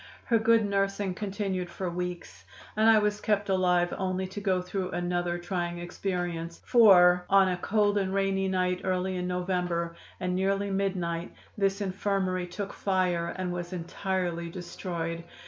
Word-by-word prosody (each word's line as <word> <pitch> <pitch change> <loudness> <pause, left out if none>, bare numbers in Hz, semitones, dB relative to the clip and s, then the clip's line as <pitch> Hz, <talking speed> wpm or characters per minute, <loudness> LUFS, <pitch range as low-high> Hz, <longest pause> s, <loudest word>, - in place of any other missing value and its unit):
Her 230 -2 +3
good 225 0 +4
nursing 195 -1 0
continued 195 -2 -3
for 185 +1 -4
weeks, 175 - -5 0.3
and 220 +1 +4
I 225 - +7
was 210 0 +1
kept 205 -1 0
alive 180 -2 +2
only 190 0 -1
to 205 +2 -6
go 190 -2 +1
through 185 +1 -3
another 175 0 -1
trying 175 -1 -3
experience, 175 -1 -4
for 180 -7 +6
an 195 -1 +5
a 180 - -1
cold 205 +2 +2
and 190 -1 -1
rainy 195 0 +1
night 180 -1 0
early 185 0 0
in 180 0 -2
November, 180 -2 -1 0.2
and 180 -1 -1
nearly 195 +1 0
midnight, 180 -3 -2 0.2
this 195 0 0
infirmary 190 -2 -1
took 200 +3 -5
fire 180 -3 0
and 185 -1 -2
was 175 0 -5
entirely 175 -1 -2
destroyed. 170 -1 -5
185 Hz, 150 wpm, -28 LUFS, 175-195 Hz, 0.3 s, I